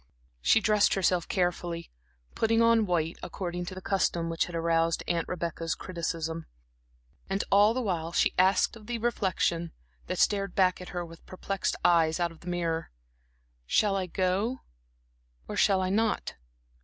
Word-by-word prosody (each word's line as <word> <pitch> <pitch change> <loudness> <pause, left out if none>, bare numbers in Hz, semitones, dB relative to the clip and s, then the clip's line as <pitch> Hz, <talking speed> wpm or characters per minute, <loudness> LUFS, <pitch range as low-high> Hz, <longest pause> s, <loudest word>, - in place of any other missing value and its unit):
She 225 - +5
dressed 210 -1 +3
herself 180 -3 +1
carefully, 175 -2 -2 0.4
putting 225 0 +2
on 230 -2 +4
white, 165 -2 -1
according 175 0 -4
to 185 - -7
the 185 - -9
custom 170 -4 0
which 165 - +1
had 175 - -8
aroused 165 0 +1
Aunt 170 -1 0
Rebecca's 165 -2 -3
criticism; 165 -2 -4 0.8
and 195 +1 0
all 205 +3 +5
the 255 - -1
while 170 -5 -2
she - - +2
asked 190 +5 +3
of 215 -2 -14
the 240 -1 -2
reflection 185 -7 0 0.3
that - - -3
stared 195 -3 +1
back 185 -1 +3
at 180 - -8
her 175 -1 -4
with 165 0 -13
perplexed 195 +1 -2
eyes 165 -2 +4
out 170 -1 0
of 165 - -15
the 175 - -14
mirror: 170 -2 -2 0.8
"Shall 205 - +3
I 190 -2 -1
go, 190 +8 -1 0.9
or - - -5
shall 195 -2 +3
I 185 - -1
not?" 220 +1 0
180 Hz, 160 wpm, -28 LUFS, 170-200 Hz, 0.9 s, She